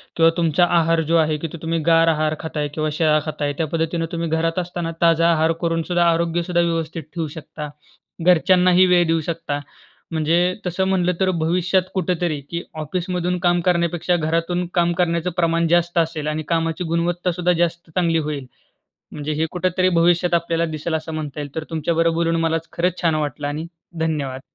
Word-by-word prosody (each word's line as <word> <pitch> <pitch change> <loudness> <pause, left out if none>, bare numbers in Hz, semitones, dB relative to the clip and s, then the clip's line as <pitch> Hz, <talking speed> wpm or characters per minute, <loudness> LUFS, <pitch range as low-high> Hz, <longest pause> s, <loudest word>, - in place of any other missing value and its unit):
किंवा 165 0 +5
तुमचा 170 +1 +3
आहार 165 0 +2
जो - - +4
आहे 155 -1 +2
की 165 - -4
तुम्ही 165 0 -1
गार 165 0 +5
आहार 155 -1 +1
खाताय 150 -2 -3
किंवा 155 0 -1
शिळा 155 -1 +3
खाताय. 150 -2 -2
त्या 160 - 0
पद्धतीने 165 +1 -1
तुम्ही 170 -1 -2
घरात 165 +2 0
असताना 175 -1 -3
ताजा 165 0 +4
आहार 160 0 +2
करूनसुद्धा 170 +1 +1
आरोग्यसुद्धा 170 +1 0
व्यवस्थित 165 -1 -2
ठेवू 165 -3 -2
शकता, 150 0 -8 0.6
घरच्यांनाही 180 +1 +5
वेळ 180 -1 +4
देऊ 165 0 +1
शकता. 155 -3 -3 0.5
म्हणजे 160 +1 +2 0.3
तसं 180 +1 -1
म्हटलं 180 -2 +2
तर 190 -1 +2
भविष्यात 180 +3 +2
कुठेतरी 175 -4 -1
की 170 0 -3 0.2
ऑफिसमधून 180 +3 -2
काम 175 0 +3
करण्यापेक्षा 175 0 +1
घरातून 170 +2 0
काम 175 -1 +2
करण्याचं 170 0 0
प्रमाण 170 -1 +2
जास्त 175 +1 +1
असेल 160 -2 0
आणि 155 +1 -2
कामाची 165 +1 0
गुणवत्ता 175 +2 0
सुद्धा 180 +1 0
जास्त 170 0 -1
चांगली 170 -2 +2
होईल. 150 -3 -3 0.7
म्हणजे 150 +1 -4
हे 160 - +2
कुठेतरी 185 0 +1
भविष्यात 175 0 +3
आपल्याला 170 0 +1
दिसेल 160 +2 -3
असं 160 0 -3
म्हणता 150 -2 -5
येईल. 145 -1 -7
तर 160 - -3
तुमच्या 165 +1 -1
बरोबर 165 0 +2
बोलून 165 0 +1
मला 165 0 +1 0.2
खरंच 180 +1 -1
छान 165 -2 +3
वाटलं 145 -2 -2
आणि 155 +3 -4 0.3
धन्यवाद! 145 -5 -2
165 Hz, 175 wpm, -21 LUFS, 160-175 Hz, 0.7 s, किंवा